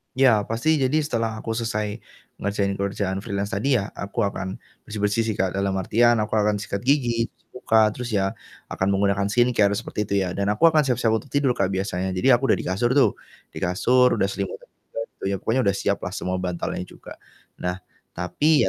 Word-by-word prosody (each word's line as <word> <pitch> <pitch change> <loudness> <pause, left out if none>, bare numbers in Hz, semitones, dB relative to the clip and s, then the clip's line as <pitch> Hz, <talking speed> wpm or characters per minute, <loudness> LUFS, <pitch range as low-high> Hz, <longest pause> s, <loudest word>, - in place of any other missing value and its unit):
Ya 125 -6 +4
pasti 135 +8 +1
jadi 140 +3 +2
setelah 115 -6 -2
aku 115 0 -3
selesai 105 -2 -2 0.4
ngerjain 100 -1 -1
kerjaan 100 -1 -2
freelance 100 -1 -3
tadi 135 +5 0
ya, 100 - -6
aku 100 +4 -3
akan 95 -2 -3 0.2
bersih-bersih 105 +1 0
sih, 110 - 0
Kak, 95 -1 -1
dalam 100 0 0
artian 120 +5 +4
aku 110 +1 -1
akan 105 -1 +1
sikat 100 +2 -5
gigi, 120 -4 +2
cuci - - -38
muka, 110 -3 +4
terus 120 +2 -6
ya 95 -1 +2 0.4
akan 95 - -1
menggunakan 100 0 +1
skincare 110 -1 +3
seperti 105 +1 -3
itu 100 - -4
ya, 95 - -1
dan 100 +1 +1
aku 165 +10 +5
akan 155 -2 +3
siap-siap 125 -3 +1
untuk 140 - -10
tidur, 140 -3 +2
Kak, - - +2
biasanya 95 -1 -2
jadi 120 +7 +4
aku 135 - -2
udah - - +3
di - - -9
kasur 120 +7 +1
tuh, 140 0 +3 0.3
di - - -12
kasur 125 +8 +3
udah 100 -4 +1
selimutan 100 -1 -5
juga - - -11 0.2
gitu - - -15
ya, - - +1
pokoknya 130 +4 +1
udah 100 - +2
siap 100 - +1
lah 90 - -4
semua 95 -2 -2
bantalnya 90 -1 -3
juga. - - -13 0.4
Nah 90 +1 -3 0.3
tapi 145 - +2
105 Hz, 200 wpm, -24 LUFS, 100-120 Hz, 0.4 s, aku